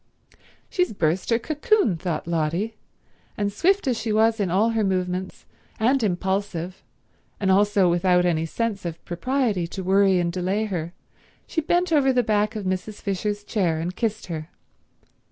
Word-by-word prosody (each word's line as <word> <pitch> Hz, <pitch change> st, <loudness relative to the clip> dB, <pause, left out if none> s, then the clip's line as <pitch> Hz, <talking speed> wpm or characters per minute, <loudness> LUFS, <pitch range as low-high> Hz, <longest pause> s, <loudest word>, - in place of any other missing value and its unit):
"She's 360 Hz, -, 0 dB
burst 175 Hz, 0 st, 0 dB
her 230 Hz, -, +4 dB
cocoon," 310 Hz, -, +1 dB
thought 170 Hz, 0 st, -3 dB
Lotty; 170 Hz, +6 st, -1 dB, 0.6 s
and 205 Hz, -1 st, -1 dB
swift 390 Hz, -, +2 dB
as 245 Hz, -3 st, +1 dB
she 225 Hz, 0 st, -2 dB
was 220 Hz, +1 st, +3 dB
in 195 Hz, -3 st, 0 dB
all 205 Hz, +6 st, +2 dB
her 225 Hz, -1 st, +1 dB
movements, 185 Hz, -1 st, -2 dB, 0.3 s
and 255 Hz, +4 st, +3 dB
impulsive, 190 Hz, -2 st, -2 dB, 0.6 s
and 190 Hz, -2 st, +2 dB
also 200 Hz, -1 st, +4 dB
without 180 Hz, +1 st, +3 dB
any 165 Hz, -2 st, +1 dB
sense 220 Hz, +2 st, -2 dB
of 170 Hz, -1 st, -6 dB
propriety 210 Hz, -1 st, 0 dB
to 190 Hz, +2 st, -6 dB
worry 195 Hz, 0 st, +4 dB
and 170 Hz, -1 st, -1 dB
delay 190 Hz, +4 st, 0 dB
her, 175 Hz, -4 st, -4 dB, 0.5 s
she 320 Hz, -, -1 dB
bent 350 Hz, +3 st, +1 dB
over 275 Hz, -3 st, +4 dB
the 250 Hz, -1 st, +2 dB
back 215 Hz, 0 st, +1 dB
of 210 Hz, -3 st, -4 dB
Mrs. 185 Hz, +3 st, -3 dB
Fisher's 205 Hz, +1 st, -2 dB
chair 180 Hz, -7 st, 0 dB
and 175 Hz, +3 st, -3 dB
kissed 220 Hz, -2 st, -2 dB
her. 160 Hz, -2 st, -6 dB
200 Hz, 160 wpm, -24 LUFS, 180-225 Hz, 0.6 s, her